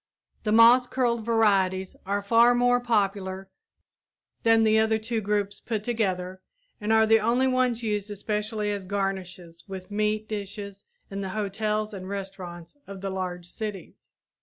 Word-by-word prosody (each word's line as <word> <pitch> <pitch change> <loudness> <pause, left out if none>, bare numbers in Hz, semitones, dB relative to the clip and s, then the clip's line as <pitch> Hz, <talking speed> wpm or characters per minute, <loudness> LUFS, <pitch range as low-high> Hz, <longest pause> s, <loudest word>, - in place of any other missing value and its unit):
The 210 - -1
moss 235 +3 +7
curled 240 -3 0
varieties 195 -5 +2
are 200 +1 -1
far 235 +3 +5
more 245 0 +3
popular 195 -5 -1 0.9
than 225 -1 +4
the 220 0 +4
other 220 0 +2
two 220 +1 -2
groups 205 -1 -1
put 220 -3 -3
together 190 -5 -2 0.4
and 210 +1 -1
are 220 0 +5
the 225 0 +5
only 235 +4 +2
ones 255 -2 +1
used 210 -2 -2
especially 210 +1 -2
as 200 -2 -4
garnishes 185 -3 -4
with 190 0 -8
meat 215 +1 0
dishes 200 -1 -6 0.3
in 195 0 -4
the 190 - -4
hotels 215 +1 -1
and 190 -1 -7
restaurants 190 - -7
of 195 -1 -8
the 195 -1 -3
large 180 -2 -4
cities. 200 0 -8
210 Hz, 150 wpm, -26 LUFS, 195-225 Hz, 0.9 s, moss